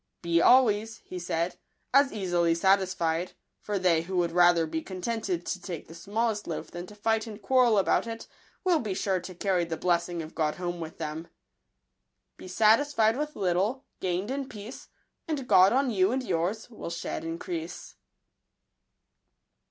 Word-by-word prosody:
" - - -53
Be 170 0 +2
always," 225 -3 +4
he 180 - -6
said, 170 0 -2 0.2
" - - -47
as 275 0 +5
easily 175 -5 +1
satisfied; 180 -2 +1 0.3
for 205 -1 -3
they 180 -4 +3
who 185 +2 -4
would 170 -1 +1
rather 175 -1 +5
be 160 0 -3
con 185 +1 -8
tented 190 -4 -2
to 185 - -3
take 175 -5 -6
the 165 - -11
smallest 210 +4 -2
loaf - - -5
than 175 +1 -7
to 210 - -13
fight 220 +2 0
and 215 -1 -8
quarrel 240 0 +3
about 195 +4 +2
it, 230 0 -6 0.4
will 360 -4 +3
be 210 -7 -3
sure 190 -1 0
to 180 +1 -9
carry 185 -1 +1
the 165 -1 -4
blessing 175 -1 0
of 155 - -10
God 155 -2 0
home 175 -1 -4
with 160 -1 -7
them." 160 +1 -5 1.1
Be - - -11
satisfied 220 +3 +3
with 300 +2 -3
little, 200 +8 0
gain'd 185 +5 -2
in 270 -1 -3
peace, 215 +4 -9 0.4
And 290 -5 -3
God 185 +2 +6
on 265 0 +2
yon 195 +1 +2
and 260 0 -1
yours 185 +1 -1
will 225 -7 -8
shed 170 -1 -4
increase. 165 0 -5
185 Hz, 175 wpm, -28 LUFS, 170-225 Hz, 1.1 s, God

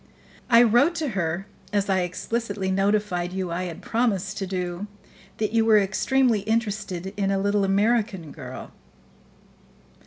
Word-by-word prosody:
"I 235 -1 +7
wrote 245 +9 +4
to 315 -4 -1
her 180 -3 -2 0.3
as 205 -1 +1
I 190 -1 +2
explicitly 195 +2 -2
notified 195 -2 0
you 185 -2 -3
I 180 +2 -2
had 170 -2 -7
promised 210 -4 0
to 195 - -3
do 180 +1 -3 0.5
that 215 -1 -1
you 225 -1 +4
were 220 -1 +5
extremely 225 +4 +2
interested 205 -4 -2
in 195 -1 0
a 195 - +1
little 200 +1 +1
American 200 -4 +1
girl." - - -9
200 Hz, 145 wpm, -25 LUFS, 190-225 Hz, 0.5 s, I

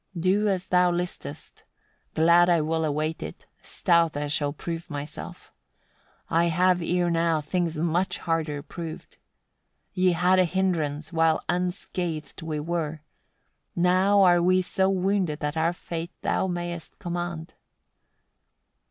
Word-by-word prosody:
56. 170 - -4
Do 200 +3 +3
as 190 -2 0
thou 180 -1 +4
listest, 175 +1 -6 0.5
glad 170 +2 +5
I 170 -1 +4
will 160 +1 0
await 155 +2 -2
it; - - -8 0.2
stout 170 -4 +1
I 145 - -1
shall 145 0 0
prove 165 +3 -6
myself: 145 0 -8 0.7
I 165 +1 +2
have 180 +2 +2
ere 175 +1 +1
now 165 -1 +2
things 165 +1 -2
much 170 +3 0
harder 155 -4 -2
proved. 165 0 -8 0.8
Ye 185 -2 +3
had 180 +2 +3
a 185 - +5
hindrance 165 -4 -1
while 160 -1 +3
unscathed 175 -3 -3
we 155 -2 -3
were: 160 -1 -3 0.7
now 185 +3 +4
are 175 -2 +5
we 185 +1 +3
so 190 +1 +1
wounded 190 -4 0
that 150 0 -2
our 165 +1 +2
fate 170 -1 -6
thou - - +1
mayest 175 -2 -5
command. 175 -1 -5
170 Hz, 135 wpm, -26 LUFS, 160-180 Hz, 0.8 s, glad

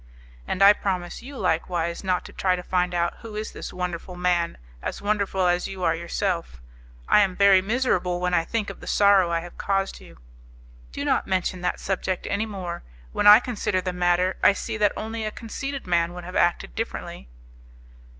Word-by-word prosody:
"And 190 - +1
I 200 +1 +9
promise 185 -4 -3
you 270 +3 -9
likewise 170 0 -1
not 185 -2 0
to - - -11
try 185 -1 +1
to 180 - -6
find 180 -1 0
out 170 0 0
who 225 -2 -9
is 215 +1 -4
this - - -7
wonderful 180 0 -5
man 175 -1 0 0.2
as - - -4
wonderful 200 -2 0
as 175 0 +1
you 190 -1 -6
are 165 - +3
yourself. 170 - -3 0.5
I - - +6
am 195 -3 +2
very 200 -1 +6
miserable 190 -5 0
when 180 0 -1
I 165 - +3
think 215 +4 -2
of - - -13
the - - -11
sorrow 200 -3 +4
I 170 -1 0
have 175 +1 -11
caused 195 -1 -1
you." - - -15 0.7
"Do - - -4
not - - +1
mention 185 -1 -1
that 180 - -1
subject 190 -1 -2
any 215 +2 0
more; 180 -5 -5 0.3
when 205 - +1
I 210 +1 +11
consider 220 -6 -1
the 185 0 -3
matter, 180 +1 +1
I - - +6
see 220 +2 -4
that 210 -1 +3
only 220 +1 -4
a 215 - -1
conceited 270 +6 -6
man 170 -1 +1
would 180 - -7
have 180 +1 -8
acted 175 - +1
differently." 60 +1 -5
185 Hz, 195 wpm, -24 LUFS, 175-205 Hz, 0.7 s, I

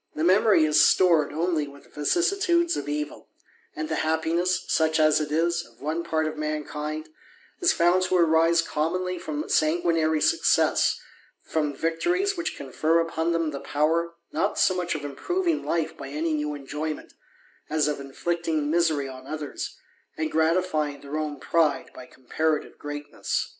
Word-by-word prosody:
The 155 - -2
memory 185 -1 +5
is 150 -1 +5
stored 165 -4 +4
only 160 -1 0
with 140 0 -15
vicissitudes 345 - +2
of - - -4
evil; 150 0 -4 0.5
and 155 +1 -4
Ae 160 - 0
happiness, 170 +3 0
such 160 0 +2
as 155 0 +4
it 150 -1 -4
is, 170 +2 +1
of - - -20
one 155 +4 -2
part 160 -1 0
of 155 0 -3
mankind, 155 0 -4 0.5
is 355 - +4
found 175 +2 +3
to 185 - +2
arise 165 0 +4
commonly 180 +4 -2
from 155 -3 -4
sanguinary 160 -1 +2
success, - - +3 0.4
from 150 -3 -1
wctories 355 - 0
which 340 -2 -3
confer 155 +5 +1
upon 165 0 -1
them 165 -2 0
the 140 - -5
power, 165 +4 0 0.2
not 200 - -1
so 185 - +4
much 180 -2 -2
of 145 -1 -5
improving 340 - -1
life 160 -1 -1
by - - -8
any 155 +3 -2
new 150 -1 -2
enjoyment, 150 +2 -5 0.6
as 150 -1 +1
of 150 -1 -2
inflict 170 +5 -3
JDg 155 -2 0
misery 160 -4 +2
on 130 0 -10
others, 150 -1 -5 0.4
and 155 0 -2
gratifying 160 -2 +1
their 145 +2 -5
own 150 -2 -4
pride 155 -4 +1
by 125 - -11
comparative 155 +4 -2
greatness. 145 0 -3
160 Hz, 160 wpm, -25 LUFS, 150-170 Hz, 0.6 s, memory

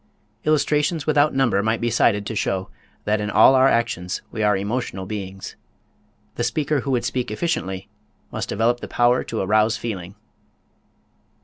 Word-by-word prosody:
Illustrations 150 +1 +1
without 150 -1 +3
number 120 -7 +2
might 110 +2 0
be 120 0 -1
cited 105 -3 +2
to 110 - -4
show 95 -2 -2 0.3
that 105 0 0
in 105 - -2
all 130 - +6
our 130 0 +5
actions 95 -8 -1
we 110 - -4
are 105 -2 +3
emotional 100 -2 -3
beings. 95 -1 -6 0.8
The 120 - -1
speaker 145 +5 0
who 135 - -5
would 125 -3 0
speak 125 -3 -2
efficiently 100 - -3 0.4
must - - -4
develop 115 +3 +1
the - - -7
power 120 +1 +2
to 115 - -4
arouse 110 +3 +2
feeling. 95 -5 -6
115 Hz, 155 wpm, -22 LUFS, 100-130 Hz, 0.8 s, all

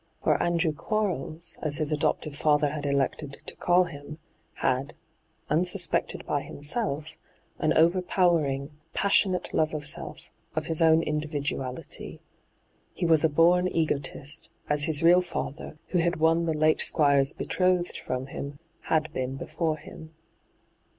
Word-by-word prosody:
For - - +2
Andrew 170 -2 +1
Quarles, 170 -3 -3
aa 155 - -1
his 150 +1 -1
adoptive 150 0 0
bther 150 0 +2
had 145 -1 -4
elected 140 +1 -1
to - - -7
call 180 +1 +3
him, 150 -3 -9 0.4
had, 130 +2 -1 0.5
unsuspected 180 +3 +1
by 145 - -1
himself, 150 0 -2 0.4
an 155 - +1
overpowering, 165 -4 +2 0.2
passionate 195 -2 +2
love 155 0 +1
of 145 -1 -4
self, 145 - -3 0.2
of 155 -1 -1
his 165 0 -1
own 160 0 +5
individuality. 145 -4 -4 0.8
He 175 - -2
was 160 -2 +4
a 160 - +4
born 175 +4 +4
egotist, 155 -3 -1 0.2
as 150 0 +2
his 160 -1 +2
real 175 +2 +6
father, 155 -3 -6
who 180 - +1
had 170 +1 +1
woo 165 +1 +3
the 160 -1 0
late 155 +1 +3
Squire's 140 -3 +3
betrothed 180 -1 0
from 130 0 -4
him, 140 +1 -7 0.3
had 155 -1 0
been 130 -1 -3
before 155 +3 -2
him. 155 +1 -12
155 Hz, 135 wpm, -27 LUFS, 145-170 Hz, 0.8 s, real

